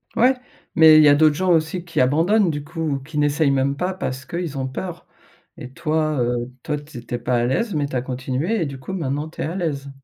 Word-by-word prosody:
Ouais, 255 +3 +4 0.4
mais 160 -1 +8
il 155 - +7
y 150 - +7
a 145 - +6
d'autres 155 0 +4
gens 185 +3 +1
aussi 165 +2 +1
qui 165 -3 -3
abandonnent 170 +10 +3
du 145 -2 -3
coup, 155 -2 -3
qui 155 +1 -7
n'essayent 145 0 +2
même 135 +1 +1
pas 180 +6 -2
parce 135 -8 -4
qu'ils 170 -5 -4
ont 130 -1 -2
peur 170 +6 -6 0.5
et 125 - -9
toi, 155 -1 0
heu 120 +1 -1
toi 150 -1 -2
tu 145 -2 -11
es - - -7
tu 120 +1 -5
es - - -1
pas 120 +1 -1
à 120 - +2
l'aise 185 - 0
mais 145 -1 +1
tu 140 - -7
as 125 - +1
continué 130 - -2
et - - +1
du 140 -2 -6
coup 160 +9 -7
maintenant 150 -3 -2
tu 160 - -8
es - - 0
à 165 - -4
l'aise. 145 -7 -3
150 Hz, 255 wpm, -21 LUFS, 135-165 Hz, 0.5 s, mais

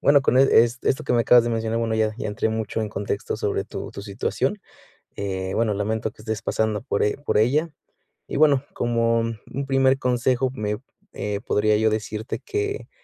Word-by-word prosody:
Bueno, 140 0 +5
con, 130 - +3
eh, 135 +1 +6 0.3
esto 135 - 0
que - - 0
me 120 - +4
acabas 120 0 +6
de 120 - -1
mencionar, 115 0 -1
bueno, 115 -1 0
ya 110 -1 +1
ya - - -3
entré 105 +1 -1
mucho 110 0 -2
en 110 - -2
contexto 100 +1 -3
sobre 105 -2 -1
tu - - -7
tu 100 - -8
situación. 120 - -2 0.6
Eh, 95 -1 -3
bueno, 115 -2 +1
lamento 110 +2 -2
que - - -17
estés 110 -2 -3
pasando 110 0 0
por 120 -5 -1
e 105 - 0
por 145 - -1
ella. 140 +10 +2 0.6
Y, - - -4
bueno, 145 -2 +4
como 115 -1 +1
un 115 +4 -4
primer 135 0 +3
consejo, 125 0 +1
me 105 -2 -2 0.3
eh, 105 -1 -3
podría 105 +1 +3
yo 110 +1 +3
decirte 110 +2 -3
que 415 +1 -3
115 Hz, 195 wpm, -23 LUFS, 105-130 Hz, 0.6 s, eh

